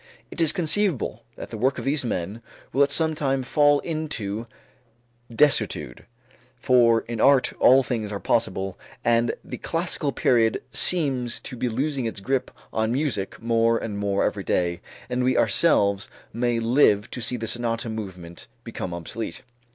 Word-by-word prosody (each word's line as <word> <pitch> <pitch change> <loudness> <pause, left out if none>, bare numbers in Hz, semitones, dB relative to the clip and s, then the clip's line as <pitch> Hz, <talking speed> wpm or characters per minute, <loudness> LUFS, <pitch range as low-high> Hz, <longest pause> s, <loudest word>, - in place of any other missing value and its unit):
It - - -4
is 160 - +5
conceivable 165 - 0
that - - -9
the 110 - -6
work 130 +4 +1
of - - -5
these 140 0 +1
men 105 -1 -3 0.3
will 135 - +2
at 140 0 +4
some 160 +1 +3
time 135 -3 -1
fall 145 +2 +3
into 120 -10 -4 0.8
desuetude, 115 - 0 0.5
for 120 -2 +4
in 115 -2 -5
art 140 -2 +4
all 135 +2 +6
things 110 -5 -3
are 100 - -4
possible, 95 -5 -1 0.3
and 120 0 +2
the - - -7
classical - - -1
period 115 -3 +2
seems 135 -9 +1
to 130 - -7
be 125 +1 -1
losing 135 +2 -1
its 110 -3 -4
grip 130 +6 -1 0.2
on 110 0 0
music 125 -7 -2
more 115 0 +2
and 105 -3 -4
more 100 -1 0
every 100 - -2
day 85 -2 0 0.3
and 125 0 -1
we 130 0 +2
ourselves 100 -3 +2 0.2
may 120 0 0
live 115 -3 +3
to 125 - -5
see 125 +2 0
the 115 - -4
sonata 115 0 -2
movement 95 -6 -7 0.2
become 95 -7 -5
obsolete. 85 +7 -6
115 Hz, 160 wpm, -24 LUFS, 110-135 Hz, 0.8 s, all